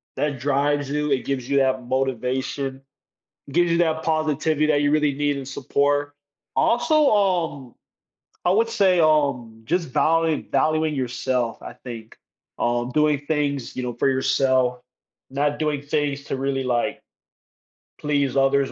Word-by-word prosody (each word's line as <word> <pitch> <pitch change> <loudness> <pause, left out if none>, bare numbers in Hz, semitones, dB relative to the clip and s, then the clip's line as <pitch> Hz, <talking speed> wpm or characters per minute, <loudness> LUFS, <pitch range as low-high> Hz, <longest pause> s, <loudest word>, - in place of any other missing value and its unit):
that 145 -3 -2
drives 145 +1 0
you, 150 +1 -1
it 135 - 0
gives 130 -3 -3
you 140 - +2
that 130 -1 +2
motivation. 130 +1 -2 0.7
It 140 - -11
gives 175 0 +3
you 170 - +2
that 160 -2 +1
positivity 155 -1 +1
that 145 -2 +2
you 145 0 +2
really 150 -1 +2
need, 145 0 -1
and 135 -1 -7
support. 145 +2 0 0.4
Also, 305 +4 +3
um, 175 - 0 0.7
I 175 - +3
would 225 +4 +2
say, 190 -5 +3
um, 140 -8 +1
just 170 +3 -1
value 160 +3 +1
valuing 155 +2 +1
yourself, 125 -2 -2
I - - -8
think. 115 -3 -10 0.4
Um, 120 +1 0
doing 150 0 +1
things, 145 -4 -1
you 130 - -3
know, 125 -1 -3
for 120 - 0
yourself, 130 -1 +1 0.5
not 145 +2 -1
doing 150 -2 -1
things 145 -1 -2
to 135 - -3
really, 135 0 -1
like, 120 -2 -1 1.0
please 140 -3 0
others, 135 0 +2
140 Hz, 150 wpm, -23 LUFS, 130-155 Hz, 1.0 s, gives